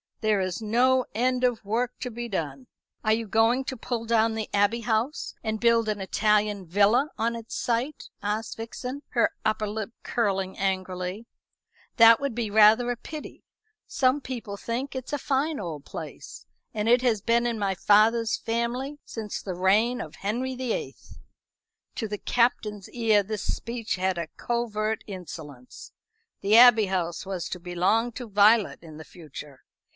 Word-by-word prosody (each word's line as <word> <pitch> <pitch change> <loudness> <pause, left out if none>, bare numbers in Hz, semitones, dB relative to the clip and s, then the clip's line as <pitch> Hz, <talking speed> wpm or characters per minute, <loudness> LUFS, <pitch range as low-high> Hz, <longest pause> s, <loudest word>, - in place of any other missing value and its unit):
There 215 -2 +2
is 185 +2 -3
no 250 +4 +3
end 250 +2 +1
of 245 -4 +1
work 235 +4 -1
to 250 - -3
be 240 +1 -5
done." 145 - -4 0.4
"Are 215 - +3
you 225 0 -2
going 225 +5 +3
to 260 - -4
pull 230 0 -3
down 225 -1 +2
the 220 -1 -4
Abbey 205 +4 +2
House 230 +4 -1
and 220 0 -2
build 230 -1 +3
an 210 -1 -1
Italian 210 0 +1
villa 205 - +3
on 230 +1 0
its 230 -1 -7
site?" 245 +5 -2
asked 210 +2 -3
Vixen, 250 +4 -6
her 235 - +2
upper 215 -1 0
lip 215 +1 -4
curling 195 -5 -1
angrily. 185 +1 -2 0.7
"That 230 -1 +8
would 280 -3 -2
be 235 -3 -2
rather 220 +3 +6
a - - -2
pity. 305 +5 -9 0.4
Some 265 +1 +2
people 230 -6 -6
think 250 +6 -4
it 260 -1 -5
a - - +1
fine 285 +2 -1
old 160 -7 -6
place, - - -9 0.3
and 215 -1 -2
it 245 +1 +5
has 225 -5 +2
been 235 +2 +2
in 235 -1 -2
my 200 -2 0
father's 220 +4 +3
family 245 +5 -2
since 215 -3 -6
the 185 -3 -5
reign 215 +7 +2
of - - -8
Henry 245 +6 -2
the 250 -2 -3
Eighth." - - -7 0.8
To 225 - -3
the 210 -1 -5
Captain's 215 -5 0
ear 225 -4 +3
this 210 +1 -4
speech 230 -1 -3
had 185 0 -1
a 170 - -3
covert 220 -2 -2
insolence. 155 - -9 0.5
The 205 +3 +5
Abbey 235 -4 +8
House 175 -3 -2
was 185 -3 -4
to 180 - -5
belong 185 +7 +1
to 245 +1 -7
Violet 210 +1 +4
in 155 -2 -11
the 160 - -9
future. 150 -4 -11
220 Hz, 165 wpm, -26 LUFS, 200-240 Hz, 0.8 s, That